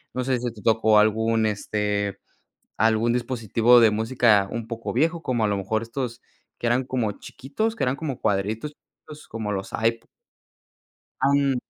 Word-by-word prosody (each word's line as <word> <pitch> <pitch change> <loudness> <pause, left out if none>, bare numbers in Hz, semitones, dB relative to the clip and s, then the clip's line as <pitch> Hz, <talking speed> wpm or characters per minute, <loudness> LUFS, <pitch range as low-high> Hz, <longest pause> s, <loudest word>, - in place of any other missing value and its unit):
no 130 - -1
sé 130 -1 0
si 120 -1 -3
te 105 -3 -14
tocó 110 -1 +4
algún, 110 +1 +2
este, 105 -1 -2 0.6
algún 115 +1 +2
dispositivo 120 -1 +3
de 115 -2 +5
música 110 -2 +2
un 115 -1 -4
poco 115 0 -5
viejo, 160 +6 +1
como 120 -4 -1
a - - +1
lo 100 -1 0
mejor 110 +3 -2
estos 120 +1 -5 0.3
que 120 - -2
eran 125 +2 +1
como 120 -5 -1
chiquitos, 215 - -4
que - - -3
eran 130 +1 0
como 145 -6 -5
cuadritos 105 +8 -1
chiquitos, 150 0 -16
como 110 -2 -4
los 95 -1 -4
iPo 115 +1 -1 1.2
Em. 140 -1 +3
115 Hz, 165 wpm, -24 LUFS, 110-130 Hz, 1.2 s, de